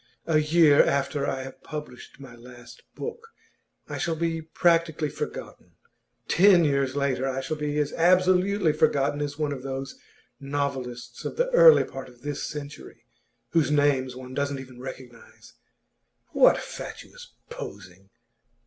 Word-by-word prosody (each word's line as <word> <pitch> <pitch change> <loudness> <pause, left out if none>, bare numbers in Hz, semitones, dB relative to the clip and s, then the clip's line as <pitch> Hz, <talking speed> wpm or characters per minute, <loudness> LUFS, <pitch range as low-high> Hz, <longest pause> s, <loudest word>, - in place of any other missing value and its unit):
A 155 -2 +3
year 155 -1 +5
after 140 0 0
I 135 -1 -2
have 135 - -11
published 150 -6 -9
my 135 -3 -11
last 120 0 -14
book, 460 0 -7 0.6
I - - -5
shall 165 -3 -1
be 165 0 -2
practically 165 -1 +1
forgotten; - - -7 0.5
ten 180 -2 +5
years 140 -2 0
later, 135 -2 0
I 135 0 -2
shall 135 +4 -3
be 150 0 -2
as 150 -1 0
absolutely 185 +1 +3
forgotten 145 -1 +1
as 145 -1 -4
one 150 -2 -1
of 135 -3 -5
those 135 +1 -6 0.4
novelists 130 -4 -4
of - - -5
the - - +1
early - - +7
part 135 -1 -9
of 120 0 -20
this 145 0 -4
century, 150 -1 -8 0.4
whose 165 -4 +2
names 145 -4 +1
one 130 0 -9
doesn't 140 0 -2
even 130 -2 -11
recognise. 125 -2 -11 0.8
What - - +5
fatuous - - -9 0.2
posing! 95 -1 -10
145 Hz, 140 wpm, -26 LUFS, 130-160 Hz, 0.8 s, early